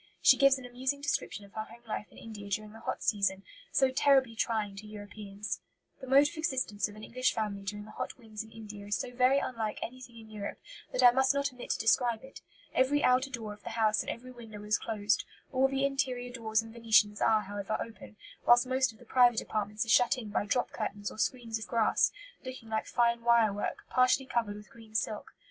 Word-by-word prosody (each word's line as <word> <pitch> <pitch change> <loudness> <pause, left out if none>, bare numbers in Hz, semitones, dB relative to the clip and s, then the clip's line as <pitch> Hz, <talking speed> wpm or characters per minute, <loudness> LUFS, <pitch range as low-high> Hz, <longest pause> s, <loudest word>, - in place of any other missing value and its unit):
She - - +7
gives 275 -1 +5
an 260 - -9
amusing 260 +3 -2
description 210 -8 -2
of 200 - -19
her 220 0 -4
home 235 +2 -15
life 210 -1 -4
in - - -17
India 210 -3 -9
during 210 +1 -3
the 225 - -12
hot - - -4
season, 200 -2 +1 0.3
so 265 -2 +3
terribly 265 -3 +3
trying 215 -3 -1
to 210 +2 -9
Europeans: 205 0 -6 0.4
"The 265 - -9
mode 275 +3 +6
of 325 - -9
existence 260 -11 0
of 205 - -12
an 215 - -11
English 255 +3 0
family 210 -2 -2
during 205 +1 -5
the 215 - -12
hot - - -5
winds 220 -3 -7
in 220 - -16
India 210 -2 -9
is 205 - 0
so 245 - -5
very 255 +2 +4
unlike 225 -6 -2
anything 250 -1 -9
in 220 -1 -14
Europe 205 -1 -5 0.3
that - - +1
I 245 - +10
must 265 +2 +3
not 280 -1 0
omit 250 - -9
to - - +1
describe 230 +1 +2
it. 265 - -12 0.3
Every 275 +3 +3
outer 255 +2 +4
door 225 -5 -5
of 205 - -16
the - - -6
house 215 -1 +3
and - - -6
every 255 +2 -6
window 225 -4 -10
is 210 +1 +1
closed; 205 -3 0 0.3
all 265 0 +3
the 270 0 0
interior 255 -3 -1
doors 220 -2 0
and 225 0 -11
venetians 225 -3 +3
are, 220 -1 +4
however, 205 +1 -3
open, 225 -1 -8 0.3
whilst 240 +1 +6
most 260 0 +1
of 220 - -19
the 245 - -17
private 240 -1 +5
apartments 210 +1 -2
are - - -9
shut 245 +3 +5
in 225 -4 -6
by 205 0 -1
drop 245 +4 0
curtains 205 -2 -4
or - - -11
screens 230 -3 -1
of 220 - -7
grass, 230 -2 +3 0.3
looking 255 -3 -8
like 220 0 -1
fine 235 -1 +2
wire 230 -3 +4
work, 205 - -3
partially 255 +1 +4
covered 230 -5 -1
with 210 0 -12
green 225 -2 -15
silk. 215 -1 -2
225 Hz, 225 wpm, -31 LUFS, 210-255 Hz, 0.4 s, I